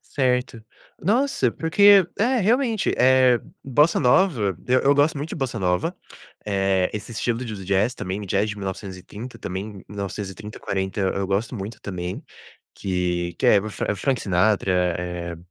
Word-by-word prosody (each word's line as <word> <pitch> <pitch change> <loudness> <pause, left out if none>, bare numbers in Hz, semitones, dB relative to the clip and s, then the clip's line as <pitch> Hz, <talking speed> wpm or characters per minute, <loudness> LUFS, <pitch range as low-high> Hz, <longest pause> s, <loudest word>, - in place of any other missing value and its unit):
Certo. 125 -3 -1 0.4
Nossa, 215 - +2
porque 195 - +5
É, 245 +5 +2
realmente, 230 +1 +1
eh, 130 -1 +5 0.2
bossa 145 +5 +3
nova, 125 - +2
eu 130 +1 +4
eu 140 +1 +4
gosto 145 +3 +3
muito 145 +3 -4
de - - -4
bossa 130 -6 -3
nova, 90 -2 0 0.5
eh, 95 -2 +1
esse 105 +2 -6
estilo 120 +2 -2
de 110 -3 -5
do 95 -2 -8
jazz 100 +6 +1
também 95 +3 -4
me 100 - -7
jazz 100 +3 +1
de 105 - -5
1930 100 +4 -7
também, 95 +4 -5 0.2
1930, 100 +1 -6
40 95 +1 -2
e - - +1 0.2
eu 100 - -1
gosto 100 +5 -1
muito 105 0 -6
também, 90 -2 -5 0.5
que 90 -2 -2
que - - +1
é 100 - +6
o 110 +2 -6
Fran - - -4
é - - +2
o - - -6
Frank 130 +3 0
Sinatra, 95 +1 +2 0.3
eh, 90 -1 -5
105 Hz, 170 wpm, -23 LUFS, 95-130 Hz, 0.5 s, é